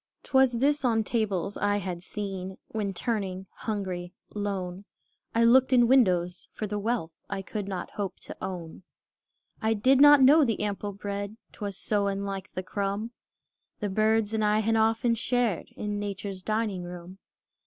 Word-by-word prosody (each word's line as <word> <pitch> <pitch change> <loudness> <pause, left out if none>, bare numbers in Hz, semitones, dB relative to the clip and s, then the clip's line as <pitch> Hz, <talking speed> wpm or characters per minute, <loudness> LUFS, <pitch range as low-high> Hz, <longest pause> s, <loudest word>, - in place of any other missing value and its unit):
'T - - -17
was 265 -2 +5
this 280 +5 +2
on 225 -3 +2
tables 205 -4 -1
I 205 0 +1
had 180 -3 -4
seen, 190 -1 -5
When 210 -3 -2
turning, 190 -2 -2
hungry, 185 -5 -4 0.2
lone, 195 -2 -3 0.5
I 230 - +4
looked 255 +3 +6
in 240 -2 +6
windows, 180 -9 +3
for 215 - -4
the 210 0 -3
wealth 215 -6 -1 0.2
I 195 -1 -3
could 205 0 -4
not 185 -3 -4
hope 200 -2 -4
to - - -8
own. 175 -3 -6 0.8
I 220 0 +2
did 260 +6 +4
not 290 0 +9
know 295 +4 +7
the 230 -6 0
ample 205 0 -2
bread, 200 +1 -5
'T - - -20
was 200 -2 -3
so 205 -1 0
unlike 195 -1 -3
the 185 - -3
crumb 200 +4 -2 0.7
The 210 - -2
birds 215 +2 +2
and 220 -1 +1
I 210 0 +3
had 225 +1 +1
often 225 +2 +3
shared 235 -4 0
In 210 -1 -3
Nature's 200 -1 -5
dining 215 -2 -1
room. 175 +1 -9
205 Hz, 165 wpm, -28 LUFS, 190-225 Hz, 0.8 s, not